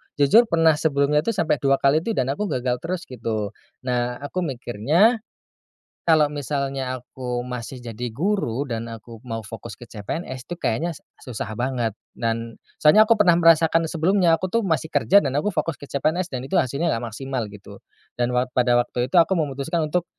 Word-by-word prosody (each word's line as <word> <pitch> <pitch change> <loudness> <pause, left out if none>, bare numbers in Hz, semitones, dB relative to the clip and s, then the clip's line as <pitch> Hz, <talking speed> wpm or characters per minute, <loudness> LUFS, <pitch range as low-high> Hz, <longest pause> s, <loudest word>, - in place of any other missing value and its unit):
jujur 150 - +5
pernah 165 -4 +3
sebelumnya 150 -1 +2
tuh 225 +9 -1
sampe 160 -6 +1
2 135 +1 +3
kali 140 +2 +3
tuh, 220 +7 -3
dan 130 +1 0
aku 210 +9 -2
gagal 125 -5 -1
terus 170 +3 -4
gitu. 110 -4 -4 0.3
Nah 125 -1 -1
aku 145 +6 -3
mikirnya, 145 - +2 0.9
kalo 160 -3 +5
misalnya 135 -2 -3
aku 125 -1 -5
masih 125 +1 -6
jadi 120 0 -5
guru, 150 - 0
dan 115 -2 -4
aku 115 +1 -10
mau 115 -2 -4
fokus 115 +1 -8
ke 120 - -11
CPNS 125 - -6
tuh - - -2
kayanya 165 +4 -1 0.3
susah 110 -3 -5
banget. 120 -2 -1 0.2
Dan 115 0 -3 0.2
soalnya 210 +9 +7
aku 230 - +5
pernah 180 -5 +5
merasakan 165 0 +4
sebelumnya, 170 +1 +3
aku 185 +2 -4
tuh 230 - +2
masih 160 -2 -1
kerja 200 - +4
dan 135 - -2
aku 180 - 0
fokus 165 -6 -1
ke 145 - -9
CPNS, 160 +6 0
dan 125 - -3
itu 135 - -5
hasilnya 140 +7 -1
nggak 115 -1 -4
maksimal 130 -2 -3
gitu. 100 -1 -12 0.4
Dan 120 0 +1
wak 125 +1 0
pada 125 -1 +3
waktu 120 0 -1
itu - - +1
aku 165 +2 +4
memutuskan 150 +2 -1
untuk, 170 +3 0
135 Hz, 180 wpm, -23 LUFS, 120-165 Hz, 0.9 s, soalnya